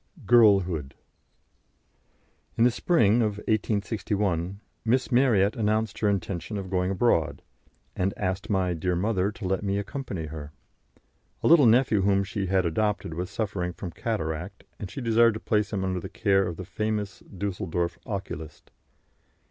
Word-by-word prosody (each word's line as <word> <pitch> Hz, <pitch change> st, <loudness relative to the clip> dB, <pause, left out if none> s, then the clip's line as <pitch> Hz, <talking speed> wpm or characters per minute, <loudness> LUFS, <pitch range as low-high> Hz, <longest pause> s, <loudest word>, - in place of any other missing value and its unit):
GIRLHOOD. 95 Hz, -, +4 dB, 1.6 s
In 115 Hz, -, +4 dB
the 125 Hz, -, +5 dB
spring 115 Hz, -, +3 dB
of 105 Hz, -2 st, 0 dB
1861 100 Hz, -4 st, -1 dB, 0.2 s
Miss 120 Hz, +1 st, +1 dB
Marryat 115 Hz, -6 st, +3 dB
announced 110 Hz, -2 st, 0 dB
her 105 Hz, -, +2 dB
intention 100 Hz, +1 st, -2 dB
of 95 Hz, -1 st, -6 dB
going 90 Hz, -1 st, +1 dB
abroad, 95 Hz, -5 st, +1 dB, 0.5 s
and 95 Hz, +1 st, 0 dB
asked 95 Hz, -1 st, -2 dB
my 95 Hz, -3 st, +1 dB
dear 90 Hz, +2 st, -1 dB
mother 100 Hz, +1 st, 0 dB
to 105 Hz, -, -8 dB
let 95 Hz, +1 st, 0 dB
me 100 Hz, 0 st, 0 dB
accompany 100 Hz, -, -4 dB
her. 75 Hz, -1 st, -8 dB, 0.9 s
A -, -, +3 dB
little 155 Hz, -6 st, +7 dB
nephew 115 Hz, -3 st, +4 dB
whom 100 Hz, 0 st, +3 dB
she 100 Hz, -1 st, -3 dB
had 95 Hz, 0 st, +2 dB
adopted 105 Hz, 0 st, -1 dB
was 90 Hz, +3 st, -4 dB
suffering 95 Hz, -4 st, -3 dB
from 90 Hz, -1 st, -7 dB
cataract, 90 Hz, -2 st, -4 dB, 0.2 s
and 100 Hz, -, -6 dB
she 135 Hz, -, -6 dB
desired 115 Hz, -1 st, +4 dB
to -, -, -4 dB
place 105 Hz, -2 st, 0 dB
him 100 Hz, -3 st, -1 dB
under 95 Hz, -1 st, -1 dB
the -, -, -7 dB
care 95 Hz, -1 st, +2 dB
of 85 Hz, -, -5 dB
the 95 Hz, -, -6 dB
famous 105 Hz, 0 st, -3 dB
Düsseldorf 90 Hz, -3 st, -3 dB
oculist. 85 Hz, -6 st, -6 dB
100 Hz, 150 wpm, -26 LUFS, 90-110 Hz, 1.6 s, little